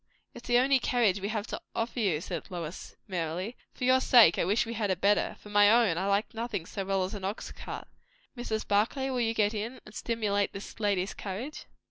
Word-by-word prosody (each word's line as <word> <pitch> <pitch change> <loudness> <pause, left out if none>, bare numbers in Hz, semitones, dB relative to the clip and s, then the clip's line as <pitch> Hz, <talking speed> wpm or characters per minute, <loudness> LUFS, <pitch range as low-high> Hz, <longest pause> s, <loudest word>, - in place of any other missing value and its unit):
"It's - - -11
the 240 - +4
only 265 +2 +4
carriage 225 -6 +2
we 200 - -2
have 215 -1 -2
to - - -6
offer 230 +2 -2
you," 180 -9 +1
said 170 -3 -5
Lois 170 -2 -6
merrily. 180 +4 -3 0.2
"For - - -8
your 260 +1 +4
sake, 230 -10 +6
I - - +2
wish 210 +5 +2
we 230 - -5
had 215 -3 -1
a 190 - +2
better; 200 +3 +2
for 210 - -13
my 205 0 +6
own, 225 -6 +4
I 190 - -1
like 200 +4 +1
nothing 225 -6 -3
so 195 - -4
well 195 0 0
as 185 - -4
an 200 -2 -6
ox 195 +3 -4
cart. - - -7 0.5
Mrs. 220 -3 -3
Barclay, 235 +7 +1
will 250 -1 0
you 225 -1 0
get 210 0 +2
in? 225 +4 -4
and 210 - -13
stimulate 210 -3 -1
this 195 +2 -9
lady's 200 -3 0
courage?" 215 +10 -6
210 Hz, 220 wpm, -29 LUFS, 195-235 Hz, 0.5 s, sake